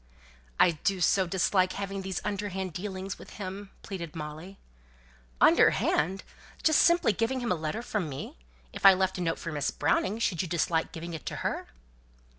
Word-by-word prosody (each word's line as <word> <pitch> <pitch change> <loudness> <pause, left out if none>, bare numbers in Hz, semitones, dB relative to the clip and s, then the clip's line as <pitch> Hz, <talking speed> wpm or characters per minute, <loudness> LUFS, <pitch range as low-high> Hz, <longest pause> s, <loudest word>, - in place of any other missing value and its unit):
"I 175 - +6
do 195 -1 +1
so 185 +1 +3
dislike 185 +1 +2
having 195 -1 -4
these 190 -1 -3
underhand 195 -3 -3
dealings 190 +2 -5
with - - -12
him," 195 0 -6
pleaded 170 -5 -6
Molly. 160 +5 -7 0.8
"Underhand! 190 +4 +4 0.4
just 315 -1 +5
simply 340 -10 +4
giving 235 +4 0
him 240 -2 -2
a - - +3
letter 180 +10 -3
from 200 -9 -2
me! 135 - -7 0.3
If - - -8
I 195 -1 +9
left 190 0 0
a - - -2
note 165 -1 0
for 165 - -5
Miss 145 -2 -1
Browning, 185 +7 0
should 200 -7 0
you 180 - -3
dislike 165 -1 0
giving 170 +1 -7
it 160 - -7
to - - -3
her?" - - -2
190 Hz, 175 wpm, -29 LUFS, 170-200 Hz, 0.8 s, I